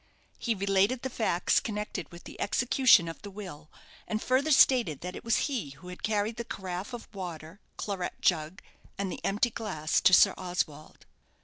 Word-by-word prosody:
He 230 Hz, -2 st, 0 dB
related 200 Hz, +5 st, +1 dB
the 265 Hz, -, -3 dB
facts 185 Hz, -7 st, +2 dB
connected 210 Hz, -6 st, -5 dB
with 170 Hz, 0 st, -12 dB
the -, -, -10 dB
execution 245 Hz, -4 st, +4 dB
of 165 Hz, -, -7 dB
the 205 Hz, -, -8 dB
will, 180 Hz, -7 st, -9 dB, 0.4 s
and 215 Hz, -, -1 dB
further 260 Hz, +6 st, +1 dB
stated 245 Hz, -, +4 dB
that 180 Hz, +1 st, -6 dB
it -, -, -8 dB
was 230 Hz, -1 st, +2 dB
he 245 Hz, -, -3 dB
who 180 Hz, -, -11 dB
had 180 Hz, -, -9 dB
carried 215 Hz, +1 st, -1 dB
the 235 Hz, -, -3 dB
carafe 190 Hz, -1 st, -6 dB
of 240 Hz, -, -7 dB
water, 175 Hz, -2 st, -7 dB, 0.2 s
claret 195 Hz, -4 st, -4 dB
jug, 160 Hz, +1 st, 0 dB, 0.3 s
and 195 Hz, -2 st, -2 dB
the -, -, -7 dB
empty 210 Hz, +4 st, +1 dB
glass 185 Hz, -9 st, -1 dB
to -, -, +5 dB
Sir 190 Hz, +2 st, +7 dB
Oswald. 175 Hz, -5 st, -4 dB
195 Hz, 180 wpm, -29 LUFS, 175-225 Hz, 0.4 s, Sir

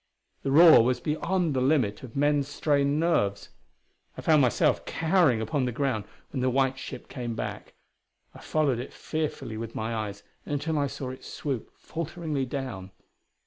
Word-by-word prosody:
The 135 Hz, -, -2 dB
roar 160 Hz, -3 st, +8 dB
was 125 Hz, +1 st, +1 dB
beyond 170 Hz, +1 st, 0 dB
the 130 Hz, -, 0 dB
limit 130 Hz, -7 st, +2 dB
of 125 Hz, -4 st, -10 dB
men's 145 Hz, 0 st, +2 dB
strained 145 Hz, 0 st, +1 dB
nerves. 100 Hz, -12 st, +1 dB, 0.7 s
I -, -, -5 dB
found 155 Hz, -2 st, +4 dB
myself 125 Hz, -4 st, +2 dB
cowering 160 Hz, -, +2 dB
upon 130 Hz, +5 st, 0 dB
the 125 Hz, -, -1 dB
ground 120 Hz, -4 st, -1 dB, 0.3 s
when 130 Hz, -, -2 dB
the 130 Hz, -, +2 dB
white 130 Hz, +1 st, +1 dB
ship -, -, -8 dB
came 120 Hz, -3 st, -5 dB
back; -, -, -6 dB, 0.6 s
I -, -, -12 dB
followed 145 Hz, -6 st, 0 dB
it 125 Hz, -, -7 dB
fearfully 155 Hz, -8 st, -4 dB
with 115 Hz, 0 st, -6 dB
my 110 Hz, +1 st, -2 dB
eyes 105 Hz, -3 st, -4 dB, 0.2 s
until 150 Hz, +2 st, -1 dB
I 140 Hz, -, +1 dB
saw 130 Hz, -1 st, -5 dB
it 130 Hz, -, -10 dB
swoop 135 Hz, -6 st, -4 dB
falteringly 160 Hz, -4 st, -4 dB
down. 120 Hz, -9 st, -5 dB
135 Hz, 165 wpm, -27 LUFS, 120-150 Hz, 0.7 s, roar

